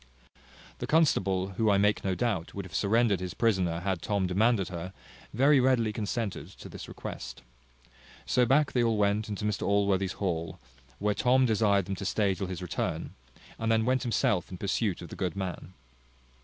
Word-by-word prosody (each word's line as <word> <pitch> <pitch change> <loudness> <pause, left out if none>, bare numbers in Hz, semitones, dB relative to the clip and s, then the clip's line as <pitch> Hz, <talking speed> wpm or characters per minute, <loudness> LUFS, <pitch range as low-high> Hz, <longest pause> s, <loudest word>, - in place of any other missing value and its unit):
The - - -4
constable, 95 - +2
who, 110 -1 +2
I 100 - +4
make 105 +1 +2
no 95 -1 0
doubt, 100 -8 -2
would 100 -1 -4
have 90 - -12
surrendered 105 +1 +2
his 90 -1 -5
prisoner 95 -7 +1
had 95 -2 -2
Tom 100 -1 0
demanded 100 +2 +2
her, 90 +1 -6 0.4
very 135 +5 +4
readily 125 -4 +2
consented 105 0 -3
to - - -11
this - - -9
request. - - -8 0.8
So 125 -1 +2
back 145 +3 +3
they 125 - +1
all 115 -2 +2
went 105 +1 +1
into 105 0 -4
Mr 105 -2 -1
Allworthy's 100 -2 +1
hall; 85 -4 -3 0.4
where 105 +1 0
Tom 130 +5 +3
desired 105 -4 +2
them 100 +1 -3
to 100 - -5
stay 100 0 +1
till 95 0 -4
his 90 0 -5
return, 90 - -3 0.5
and 115 0 0
then 110 0 +2
went 130 +1 +2
himself 105 -6 0
in 90 - -7
pursuit 100 -1 -1
of 85 - -9
the - - -8
good 90 -4 -2
man. 95 -2 -5
100 Hz, 185 wpm, -29 LUFS, 95-115 Hz, 0.8 s, I